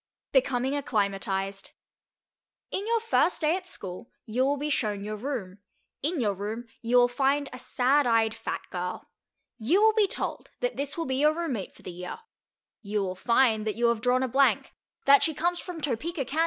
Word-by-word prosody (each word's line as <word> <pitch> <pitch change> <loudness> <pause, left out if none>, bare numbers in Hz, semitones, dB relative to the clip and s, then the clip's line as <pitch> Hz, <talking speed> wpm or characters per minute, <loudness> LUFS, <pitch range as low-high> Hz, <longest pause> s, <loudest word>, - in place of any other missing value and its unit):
BECOMING 265 0 +2
ACCLIMATIZED 195 -5 -1 1.0
In 400 +3 -2
your 460 0 +2
first 450 -5 +2
day 310 +2 +3
at 370 -1 -6
school 190 - -6 0.2
you 245 +3 0
will 280 +2 +2
be 295 +2 -2
shown 210 -6 0
your 215 +1 -4
room; 210 -5 -5 0.4
in 315 +3 0
your 210 -5 +1
room 210 +5 -5 0.2
you 235 +2 +2
will 245 0 +7
find 275 +3 +1
a 255 - -6
sad 260 +3 +2
eyed 225 -1 +3
fat 225 0 -4
girl. 180 0 -5 0.5
You 285 - +3
will 440 +1 +5
be 430 -2 +3
told - - -4
that - - -1
this 280 +2 -2
will 330 - -1
be 260 -2 -1
your 300 +2 +4
room 335 -4 -2
mate 200 -5 -5
for - - -18
the - - -6
year. 180 +1 -6 0.6
You 205 -1 -1
will 185 -1 -2
find 225 +1 +3
that 215 - -1
you 235 +1 +3
have 230 -2 0
drawn 250 +2 +2
a - - +1
blank, 270 +3 +2 0.3
that 280 0 +7
she 315 - +1
comes 350 +2 0
from 360 -3 -5
Topeka, 300 +2 -2
Kan. 295 +6 -3
255 Hz, 195 wpm, -27 LUFS, 215-295 Hz, 1.0 s, will